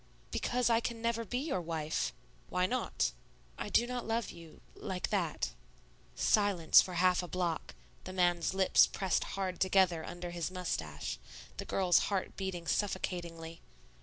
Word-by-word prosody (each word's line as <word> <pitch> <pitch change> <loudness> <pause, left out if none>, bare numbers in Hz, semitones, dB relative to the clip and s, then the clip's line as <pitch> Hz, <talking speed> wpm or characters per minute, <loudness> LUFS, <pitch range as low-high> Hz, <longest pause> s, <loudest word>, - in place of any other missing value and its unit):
"Because 250 0 0
I 230 -1 +4
can 235 0 -3
never 230 0 0
be 245 +3 -3
your 270 - -1
wife." 160 -2 -2 0.4
"Why 180 0 +1
not?" 255 +6 0 0.4
"I - - -5
do 240 - +4
not 245 -1 -4
love 225 0 -1
you 165 -2 -13
like 185 -2 -4
that." 170 - 0 0.6
Silence 200 -6 +5
for 180 - -5
half 180 +1 +4
a 180 - -6
block, 170 - -2 0.3
the 185 - -5
man's 175 -1 +1
lips 190 -1 +6
pressed 190 -4 0
hard 185 -2 -2
together 185 -3 +3
under 175 +1 -6
his 170 -1 -2
mustache, 80 - -4 0.4
the - - -4
girl's 180 -3 +3
heart 195 -2 -2
beating 190 -3 -4
suffocatingly. 170 -4 -2
185 Hz, 150 wpm, -33 LUFS, 170-205 Hz, 0.6 s, lips